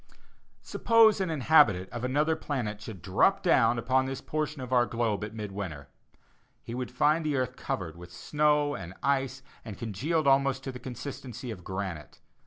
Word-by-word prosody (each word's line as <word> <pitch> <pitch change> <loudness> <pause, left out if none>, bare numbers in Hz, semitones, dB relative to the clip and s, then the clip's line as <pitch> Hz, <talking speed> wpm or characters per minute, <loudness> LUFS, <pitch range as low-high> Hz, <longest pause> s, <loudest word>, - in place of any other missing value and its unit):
Suppose 225 -3 +4
an 185 - -1
inhabitant 140 - +4
of 120 - -5
another 150 +5 +1
planet 115 -9 -4
should 100 -6 -9
drop 95 - +2
down 120 - +4
upon 130 +3 +1
this 135 0 -4
portion 155 0 -3
of 130 0 -5
our 120 -2 +4
globe 110 -2 -1
at 105 +1 -6
mid 105 -2 -5
winter. 90 -8 -6 0.7
He 115 - -7
would 125 0 -3
find 150 +6 +2
the 150 -2 0
earth 130 0 -1
covered 85 -10 -4
with 85 0 -12
snow 150 - +1
and 95 -4 -7
ice 135 -1 0 0.2
and 105 -5 -8
congealed 140 - -1
almost 135 -1 +3
to 135 - -4
the 125 - -9
consistency 125 -1 -7
of 90 -5 -9
granite. 95 -6 -6
125 Hz, 175 wpm, -28 LUFS, 105-145 Hz, 0.7 s, Suppose